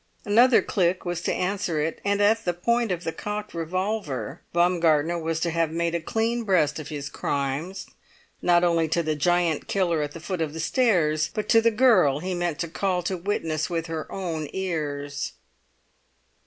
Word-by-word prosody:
Another 235 Hz, +4 st, +5 dB
click 185 Hz, -2 st, 0 dB
was 175 Hz, -1 st, -2 dB
to -, -, -1 dB
answer 185 Hz, -3 st, -1 dB
it; 155 Hz, +2 st, -2 dB
and 200 Hz, 0 st, +1 dB
at 220 Hz, +2 st, +3 dB
the 175 Hz, -3 st, -1 dB
point 235 Hz, +4 st, +1 dB
of 175 Hz, -1 st, -2 dB
the 165 Hz, -, -2 dB
cocked 210 Hz, +4 st, -5 dB
revolver 165 Hz, -, -3 dB
Baumgartner 170 Hz, -2 st, +2 dB
was 165 Hz, 0 st, -2 dB
to 170 Hz, -, 0 dB
have 165 Hz, -1 st, +1 dB
made 170 Hz, +1 st, -1 dB
a 170 Hz, -, 0 dB
clean 225 Hz, +7 st, -1 dB
breast 160 Hz, -8 st, +2 dB
of 150 Hz, -, -7 dB
his 145 Hz, -2 st, -5 dB
crimes, 145 Hz, +7 st, -3 dB, 0.6 s
not 175 Hz, 0 st, +4 dB
only 170 Hz, -2 st, +2 dB
to 170 Hz, +2 st, 0 dB
the 155 Hz, -1 st, 0 dB
giant 170 Hz, +1 st, +1 dB
killer 175 Hz, -5 st, +1 dB
at 145 Hz, 0 st, -3 dB
the -, -, -8 dB
foot 175 Hz, +1 st, -4 dB
of 155 Hz, -2 st, -2 dB
the 160 Hz, -, -6 dB
stairs 160 Hz, -7 st, +2 dB
but 215 Hz, -, -3 dB
to 225 Hz, -, +6 dB
the 230 Hz, -, +4 dB
girl 215 Hz, -, +4 dB
he 185 Hz, +5 st, -3 dB
meant 175 Hz, -3 st, -1 dB
to 170 Hz, -, -2 dB
call 180 Hz, +2 st, -1 dB
to 185 Hz, +2 st, -1 dB
witness 165 Hz, -4 st, -2 dB
with 165 Hz, -2 st, -2 dB
her 165 Hz, -2 st, -5 dB
own 165 Hz, -5 st, -3 dB
ears. 145 Hz, -6 st, -3 dB
170 Hz, 185 wpm, -25 LUFS, 155-195 Hz, 0.6 s, to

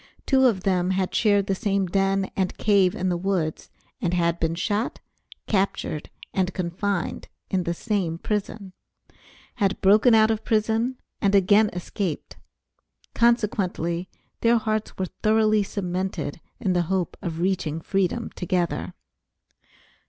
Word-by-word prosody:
Two 265 Hz, -1 st, +5 dB
of 195 Hz, -6 st, 0 dB
them 180 Hz, -2 st, +1 dB
had 190 Hz, -1 st, 0 dB
shared 205 Hz, -3 st, +3 dB
the 195 Hz, -, 0 dB
same 195 Hz, -1 st, 0 dB
den 195 Hz, +1 st, 0 dB
and 190 Hz, -2 st, -1 dB
cave 200 Hz, -4 st, +3 dB
in 185 Hz, 0 st, -1 dB
the 175 Hz, -, 0 dB
woods, 175 Hz, -4 st, -2 dB, 0.3 s
and 180 Hz, 0 st, 0 dB
had 170 Hz, -1 st, +1 dB
been 165 Hz, 0 st, 0 dB
shot, 205 Hz, +6 st, -1 dB, 0.5 s
captured, 190 Hz, -6 st, -1 dB, 0.2 s
and 190 Hz, -1 st, 0 dB
confined 185 Hz, +1 st, -2 dB, 0.2 s
in 185 Hz, -2 st, 0 dB
the 170 Hz, -, 0 dB
same 190 Hz, -6 st, -1 dB
prison; 205 Hz, 0 st, -3 dB, 0.8 s
had 195 Hz, -1 st, +1 dB
broken 215 Hz, +5 st, +5 dB
out 220 Hz, 0 st, +5 dB
of 220 Hz, 0 st, -2 dB
prison 225 Hz, +3 st, +1 dB, 0.2 s
and 200 Hz, 0 st, +3 dB
again 205 Hz, +2 st, +5 dB
escaped; 180 Hz, -1 st, -4 dB, 0.8 s
consequently 195 Hz, -7 st, +1 dB, 0.3 s
their 235 Hz, +1 st, +4 dB
hearts 215 Hz, -1 st, -2 dB
were 190 Hz, -, -1 dB, 0.2 s
thoroughly 215 Hz, 0 st, +3 dB
cemented 185 Hz, -5 st, -3 dB, 0.2 s
in 190 Hz, -, 0 dB
the 175 Hz, -, +2 dB
hope 190 Hz, -3 st, -1 dB
of 165 Hz, -1 st, -4 dB
reaching 175 Hz, -4 st, 0 dB
freedom 195 Hz, +6 st, -1 dB
together. 180 Hz, -1 st, -2 dB
195 Hz, 135 wpm, -24 LUFS, 180-215 Hz, 0.8 s, Two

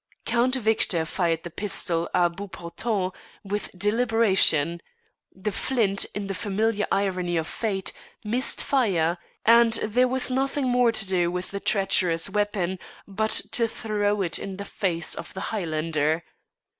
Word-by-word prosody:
Count 245 Hz, +2 st, +2 dB
Victor 215 Hz, -8 st, +2 dB
fired 165 Hz, -1 st, -1 dB
the 175 Hz, -, -7 dB
pistol 175 Hz, -3 st, 0 dB
à 175 Hz, -1 st, +2 dB
bout 200 Hz, 0 st, -7 dB
portant 185 Hz, +2 st, -3 dB, 0.3 s
with 205 Hz, 0 st, -3 dB
deliberation; 205 Hz, -7 st, +3 dB, 0.5 s
the 190 Hz, +3 st, -4 dB
flint, 200 Hz, -2 st, +1 dB
in 205 Hz, -1 st, -3 dB
the 195 Hz, -, -3 dB
familiar 210 Hz, +3 st, -1 dB
irony 185 Hz, -3 st, 0 dB
of 160 Hz, -, 0 dB
fate, 195 Hz, 0 st, -3 dB, 0.3 s
missed 245 Hz, +5 st, 0 dB
fire, 180 Hz, -, +1 dB, 0.3 s
and 230 Hz, 0 st, +6 dB
there 235 Hz, +3 st, +2 dB
was 260 Hz, +1 st, +1 dB
nothing 270 Hz, +1 st, 0 dB
more 245 Hz, -1 st, +4 dB
to 220 Hz, -3 st, 0 dB
do 180 Hz, -2 st, +1 dB
with 180 Hz, +1 st, -4 dB
the 200 Hz, -, -4 dB
treacherous 190 Hz, -4 st, +1 dB
weapon 200 Hz, -3 st, -1 dB, 0.3 s
but 215 Hz, +2 st, -1 dB, 0.2 s
to 230 Hz, -1 st, +2 dB
throw 210 Hz, -2 st, -1 dB
it 170 Hz, -, -2 dB
in 195 Hz, -1 st, -6 dB
the 200 Hz, -, -6 dB
face 170 Hz, -6 st, -1 dB
of -, -, -8 dB
the -, -, -4 dB
Highlander. 160 Hz, -4 st, -1 dB
200 Hz, 145 wpm, -25 LUFS, 175-225 Hz, 0.5 s, and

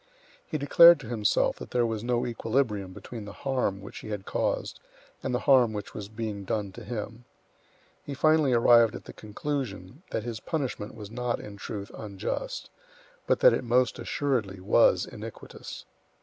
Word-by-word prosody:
He 155 Hz, -, -2 dB
declared 170 Hz, +3 st, +8 dB
to 120 Hz, -, -9 dB
himself 110 Hz, -4 st, +1 dB
that -, -, -9 dB
there 120 Hz, -1 st, +2 dB
was 110 Hz, -1 st, -2 dB
no 120 Hz, 0 st, 0 dB
equilibrium 115 Hz, -5 st, -1 dB
between 110 Hz, +3 st, -8 dB
the 100 Hz, -, -8 dB
harm 125 Hz, -8 st, 0 dB
which 100 Hz, -, -9 dB
he -, -, -9 dB
had 105 Hz, -2 st, -4 dB
caused -, -, -2 dB, 0.4 s
and -, -, -2 dB
the 125 Hz, -, 0 dB
harm 125 Hz, -5 st, +5 dB
which 105 Hz, -1 st, -6 dB
was 100 Hz, -1 st, -7 dB
being 110 Hz, -2 st, -5 dB
done 100 Hz, 0 st, -2 dB
to -, -, -10 dB
him; 115 Hz, +1 st, -6 dB, 0.8 s
he 140 Hz, -, -6 dB
finally 155 Hz, -1 st, +4 dB
arrived 115 Hz, -2 st, +5 dB
at -, -, -8 dB
the -, -, -10 dB
conclusion 110 Hz, -, -5 dB
that 110 Hz, -, -2 dB
his 115 Hz, -2 st, -5 dB
punishment 130 Hz, -9 st, -3 dB
was 105 Hz, -2 st, -9 dB
not, 125 Hz, 0 st, -2 dB
in 105 Hz, -, -9 dB
truth, 100 Hz, +1 st, -6 dB
unjust, 105 Hz, -, -5 dB, 0.6 s
but -, -, +2 dB
that -, -, +8 dB
it -, -, -1 dB
most 125 Hz, 0 st, +2 dB
assuredly 115 Hz, -10 st, -1 dB
was 95 Hz, -, +4 dB
iniquitous. -, -, -9 dB
115 Hz, 170 wpm, -28 LUFS, 105-125 Hz, 0.8 s, declared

